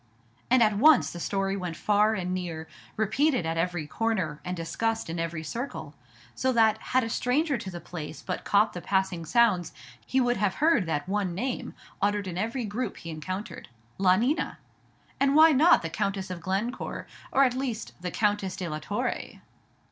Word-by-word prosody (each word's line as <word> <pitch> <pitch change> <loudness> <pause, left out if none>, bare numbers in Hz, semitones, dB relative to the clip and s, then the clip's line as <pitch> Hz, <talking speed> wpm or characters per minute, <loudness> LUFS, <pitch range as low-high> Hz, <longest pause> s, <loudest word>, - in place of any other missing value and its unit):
And 250 -1 +6
at 215 -2 +2
once 300 0 +6
the 175 - -7
story 195 +2 -1
went 180 -4 -4
far 210 +1 +3
and 180 -2 -2
near, 170 -3 -4 0.3
repeated 220 - +2
at 165 0 -1
every 165 -1 -1
corner, 190 -5 -1
and 180 0 -4
discussed 225 +4 -2
in 165 - -4
every 165 -1 -3
circle; 240 - -5 0.4
so 260 - 0
that 220 -2 +4
had 255 0 +1
a - - -2
stranger 275 +6 +1
to 195 - -6
the 175 -2 -6
place 155 -4 -8
but 185 - -4
caught 205 +2 +3
the 175 - -6
passing 190 -3 0
sounds, 210 -6 +3 0.3
he 265 - 0
would 245 -1 +2
have 195 -1 +1
heard 305 - +3
that 145 -1 -2
one 195 -3 -1
name 250 +6 -3 0.3
uttered 205 0 +1
in 180 -2 -5
every 230 +6 -2
group 215 +1 -3
he 165 - -7
encountered. 185 +6 -6 0.3
La 185 -1 +5
Nina! 255 - 0 0.6
and 275 0 +3
why 320 +1 +8
not 300 - +5
the - - -1
Countess 195 +1 -2
of 175 -2 -6
Glencore, 195 +8 -3 0.3
or, 275 - +5
at 255 -2 +3
least, 250 -4 -4
the 180 - -3
Countess 205 -1 0
de 180 - -4
la 155 -1 -4
Torre? 205 +7 -3
200 Hz, 185 wpm, -27 LUFS, 175-235 Hz, 0.6 s, why